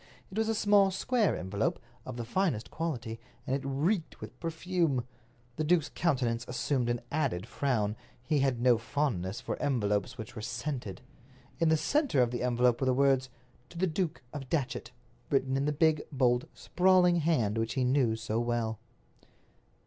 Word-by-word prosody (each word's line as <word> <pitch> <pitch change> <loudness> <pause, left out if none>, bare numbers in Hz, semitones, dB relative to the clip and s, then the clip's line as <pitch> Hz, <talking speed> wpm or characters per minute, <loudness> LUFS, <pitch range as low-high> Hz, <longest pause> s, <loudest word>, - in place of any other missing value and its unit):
It 195 - -7
was 220 0 +1
a 225 - +1
small, 205 -2 +5
square 215 +3 +1
envelope, 95 +3 -1 0.3
of - - -6
the 120 - -4
finest 155 - -1
quality, 120 -9 -3 0.3
and 135 -1 0
it 140 - -2
reeked 155 +7 -1
with 110 +4 -10
perfume. 165 -5 0 0.5
The 155 - 0
duke's 160 -1 +2
countenance 125 -8 0
assumed 125 0 0
an 120 0 -1
added 135 - 0
frown—he 125 +2 -2
had 135 -3 +1
no 120 -2 +4
fondness 115 -6 -1
for - - -4
envelopes 120 -3 0
which 110 0 -8
were 110 - -5
scented. 120 -4 -4 0.6
In 165 -1 +3
the 160 - +4
center 285 - +1
of 120 - -1
the 120 - -3
envelope 125 0 +2
were 130 - +1
the 130 - +3
words, 135 -1 +3 0.4
"To 170 - -12
the 185 - +2
Duke 170 -3 -2
of 135 -3 -6
Datchet," 135 -7 -2 0.4
written 135 -1 +1
in 135 +1 +1
the 150 - +1
big, 155 0 +3
bold, 125 -3 +2
sprawling 180 -1 +4
hand 125 -10 +1
which 115 +3 -2
he 130 - +1
knew 125 -3 +2
so 110 0 -2
well. 120 -2 -1
135 Hz, 170 wpm, -30 LUFS, 120-160 Hz, 0.6 s, small